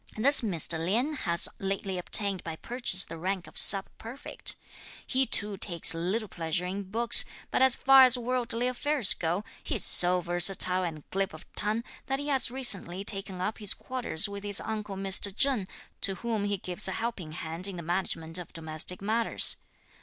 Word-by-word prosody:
This 275 Hz, +6 st, +5 dB
Mr. 170 Hz, -, +2 dB
Lien 235 Hz, -, -1 dB
has 170 Hz, -, +1 dB
lately 195 Hz, -1 st, -4 dB
obtained 195 Hz, +1 st, +3 dB
by 165 Hz, -1 st, -6 dB
purchase 235 Hz, -2 st, +1 dB
the 165 Hz, 0 st, -10 dB
rank 185 Hz, +1 st, -4 dB
of -, -, -17 dB
sub 195 Hz, -1 st, +6 dB
prefect. 240 Hz, +5 st, -3 dB, 0.5 s
He 265 Hz, 0 st, 0 dB
too 205 Hz, -1 st, +2 dB
takes 170 Hz, -4 st, +4 dB
little 185 Hz, +7 st, -3 dB
pleasure 165 Hz, 0 st, -4 dB
in 190 Hz, +1 st, -6 dB
books, 235 Hz, +3 st, +4 dB, 0.3 s
but -, -, -1 dB
as 265 Hz, -1 st, +4 dB
far 270 Hz, 0 st, +5 dB
as 255 Hz, 0 st, +4 dB
worldly 245 Hz, -1 st, -3 dB
affairs 255 Hz, -1 st, +2 dB
go, 175 Hz, +4 st, -3 dB, 0.2 s
he -, -, -4 dB
is -, -, 0 dB
so 180 Hz, +1 st, +5 dB
versatile 180 Hz, +1 st, +1 dB
and 160 Hz, -4 st, -7 dB
glib 195 Hz, -3 st, -3 dB
of 155 Hz, -, -14 dB
tongue, 215 Hz, +3 st, -2 dB, 0.2 s
that 270 Hz, -, -2 dB
he 285 Hz, +1 st, -6 dB
has 270 Hz, -3 st, +1 dB
recently 200 Hz, -8 st, +1 dB
taken 195 Hz, -2 st, -3 dB
up 210 Hz, +4 st, -4 dB
his 210 Hz, -3 st, +1 dB
quarters 245 Hz, -8 st, -3 dB
with 200 Hz, 0 st, -9 dB
his 205 Hz, -1 st, +1 dB
uncle 210 Hz, -2 st, -6 dB
Mr. 195 Hz, +1 st, +2 dB
Cheng, 265 Hz, -9 st, +1 dB, 0.3 s
to 195 Hz, -, -1 dB
whom 220 Hz, -1 st, -4 dB
he 205 Hz, 0 st, -2 dB
gives 180 Hz, 0 st, +1 dB
a 190 Hz, -, -4 dB
helping 225 Hz, -9 st, -5 dB
hand 165 Hz, +4 st, -4 dB
in 195 Hz, -, -7 dB
the 170 Hz, -, -8 dB
management 165 Hz, -1 st, -2 dB
of 180 Hz, -, -11 dB
domestic 165 Hz, +3 st, 0 dB
matters. 225 Hz, +3 st, +1 dB
195 Hz, 185 wpm, -27 LUFS, 180-230 Hz, 0.5 s, sub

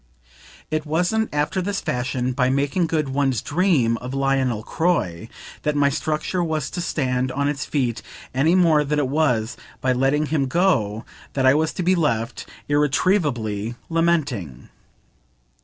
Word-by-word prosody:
It 155 Hz, 0 st, 0 dB
wasn't, 180 Hz, +8 st, 0 dB
after 150 Hz, +5 st, 0 dB
this 200 Hz, +2 st, -2 dB
fashion, 125 Hz, 0 st, -2 dB
by 125 Hz, 0 st, +1 dB
making 140 Hz, +6 st, +1 dB
good 155 Hz, -3 st, -1 dB
one's 135 Hz, -3 st, +1 dB
dream 145 Hz, -, +1 dB
of 125 Hz, +3 st, -6 dB
Lionel 135 Hz, -5 st, 0 dB
Croy 155 Hz, -, -1 dB, 0.3 s
that 150 Hz, 0 st, -1 dB
my 145 Hz, -1 st, +3 dB
structure 155 Hz, +5 st, -1 dB
was 155 Hz, -4 st, -2 dB
to 175 Hz, -, -3 dB
stand 130 Hz, -6 st, -1 dB
on 140 Hz, +1 st, 0 dB
its 145 Hz, 0 st, -2 dB
feet 125 Hz, -6 st, -1 dB, 0.3 s
any 150 Hz, +7 st, +3 dB
more 165 Hz, -5 st, +4 dB
than 150 Hz, +1 st, -1 dB
it 145 Hz, -3 st, +1 dB
was 125 Hz, -6 st, 0 dB, 0.2 s
by 130 Hz, -1 st, +1 dB
letting 135 Hz, +4 st, +1 dB
him 145 Hz, -2 st, 0 dB
go 125 Hz, -, +1 dB, 0.3 s
that 135 Hz, -1 st, 0 dB
I 130 Hz, -, +7 dB
was 155 Hz, +2 st, +1 dB
to 180 Hz, -, -3 dB
be 185 Hz, +2 st, +3 dB
left 120 Hz, -10 st, -1 dB, 0.2 s
irretrievably 140 Hz, -, +1 dB
lamenting. 150 Hz, -, -1 dB
145 Hz, 150 wpm, -22 LUFS, 125-160 Hz, 0.3 s, I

